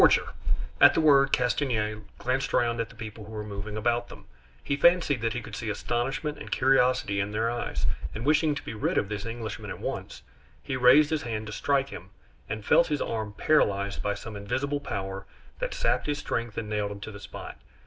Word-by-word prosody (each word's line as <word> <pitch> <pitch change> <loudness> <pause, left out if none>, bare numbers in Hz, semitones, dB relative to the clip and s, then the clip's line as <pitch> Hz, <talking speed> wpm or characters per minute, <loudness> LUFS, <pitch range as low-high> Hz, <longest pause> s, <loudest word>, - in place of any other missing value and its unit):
"Forger!" - - +5 0.5
At - - +9
the - - +3
word, 140 -3 +5
Castanier 120 -4 +1 0.2
glanced 130 +1 -1
round 120 -1 +2
at 115 - -4
the 115 - -15
people 110 -1 -8
who 110 - -10
were 105 -1 -4
moving 105 0 -6
about 120 +2 0
them. - - -12 0.4
He 140 - 0
fancied 160 -4 +4
that 115 -1 0
he 120 - -3
could 110 -1 -8
see 115 -3 -4
astonishment 135 +7 -2
and - - -8
curiosity 125 -6 +3
in 100 +1 0
their 110 +2 0
eyes, 120 - -3 0.3
and 110 +3 -4
wishing 150 0 +3
to 145 - -5
be - - -6
rid 105 - -1
of 100 - +1
this 105 +1 -4
Englishman 115 -2 -5
at - - -5
once, - - -5 0.4
he 130 - -3
raised 145 +4 +6
his 155 -2 +1
hand 110 -3 -3
to 110 - -6
strike 140 +3 +1
him 90 -6 -9 0.4
and 110 0 -4
felt 170 - +5
his 150 -1 -1
arm 110 -2 -3
paralyzed 100 -7 +2
by 100 0 -1
some 110 +1 -8
invisible 135 +8 -2
power 95 -7 -5 0.3
that - - -2
sapped - - 0
his 145 -1 0
strength 115 -6 -3
and 115 -2 -3
nailed 105 -1 -1
him 100 - -7
to 110 - -6
the 100 - -9
spot. 100 -1 -9
115 Hz, 210 wpm, -28 LUFS, 105-140 Hz, 0.5 s, At